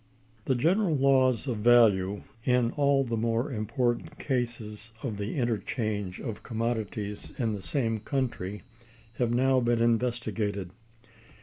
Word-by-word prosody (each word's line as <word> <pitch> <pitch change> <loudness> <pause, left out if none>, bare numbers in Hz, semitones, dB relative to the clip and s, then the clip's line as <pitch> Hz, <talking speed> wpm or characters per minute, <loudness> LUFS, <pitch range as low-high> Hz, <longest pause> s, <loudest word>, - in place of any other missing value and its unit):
The 130 - +2
general 170 - +2
laws 130 -3 +3
of 125 -5 -2
value, 105 -4 +4 0.2
in 125 -2 +2
all 140 -1 +3
the 115 -3 -2
more 115 +5 0
important 120 +2 -1
cases 115 -4 -3
of 115 -7 -3
the 105 +1 -3
interchange 110 -6 -2
of 115 -5 -5
commodities 110 -3 -3
in 115 -4 0
the 100 - -5
same 115 -2 -1
country, 105 -6 -3 0.6
have 120 -2 +2
now 130 +2 +3
been 120 -1 +1
investigated. 115 -5 0
115 Hz, 125 wpm, -28 LUFS, 105-130 Hz, 0.6 s, value